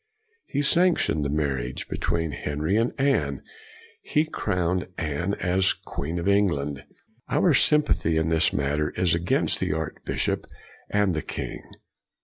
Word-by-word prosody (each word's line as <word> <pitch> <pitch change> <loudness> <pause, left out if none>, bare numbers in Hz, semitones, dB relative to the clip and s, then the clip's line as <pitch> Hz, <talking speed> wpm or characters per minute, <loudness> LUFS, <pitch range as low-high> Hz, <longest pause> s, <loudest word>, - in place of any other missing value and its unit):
He 145 - -1
sanc 175 +4 +4
tioned 75 - 0
the 70 - -1
marriage 70 -4 -2
between 80 -2 -1
Henry 75 +5 -2
and 115 +2 +2
Anne; 75 - +1 0.6
he 150 +1 +1
crowned 90 - -1
Anne 85 +4 -1
as 95 +1 +1
queen 80 +5 -5
of 85 - -2
Eng 100 0 +4
land. 70 -4 -3 0.5
Our - - +3
sympathy 150 - +3
in 80 0 +1
this 80 -1 +3
matter 75 +2 0
is 90 -3 +2
against 85 +1 +1
the - - 0
archbishop 80 0 -2 0.4
and 105 -3 +2
the 80 - -1
king. - - -5
85 Hz, 140 wpm, -25 LUFS, 75-100 Hz, 0.6 s, sanc